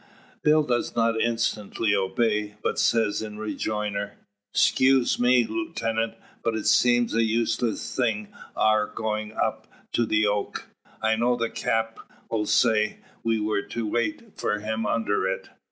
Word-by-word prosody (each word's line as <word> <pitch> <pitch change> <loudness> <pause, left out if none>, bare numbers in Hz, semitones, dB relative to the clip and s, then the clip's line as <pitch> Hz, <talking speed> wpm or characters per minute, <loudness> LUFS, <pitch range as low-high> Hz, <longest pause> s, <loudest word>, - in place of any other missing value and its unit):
Bill 155 0 +4
does 120 -4 -1
not 115 -1 +2
instantly 115 -2 0
obey, 105 +2 0
but - - 0
says 110 -3 +2
in 105 -1 -6
rejoinder: 105 -1 -3 0.4
"Skuse 130 +3 +3
me, 125 0 +5
lootenant, 115 -4 -2 0.3
but 115 -1 0
it 110 - -3
seems 120 -1 +4
a 115 - +3
useless 115 0 0
thing 110 -5 0 0.3
our 110 -1 +3
goin' 110 0 -3
up - - -2 0.3
to 120 - +2
the 110 0 +2
oak. 105 0 -2 0.3
I 110 0 +3
know 120 +2 +2
the 115 -1 -2
Cap' 110 0 -1 0.5
sayed 110 0 +2 0.2
we 115 -1 +1
were 105 -1 0
to 115 +2 -4
wait 135 - -2
for 105 - 0
them 110 +1 -2
under 105 -2 0
it. - - -3
110 Hz, 140 wpm, -25 LUFS, 105-120 Hz, 0.5 s, me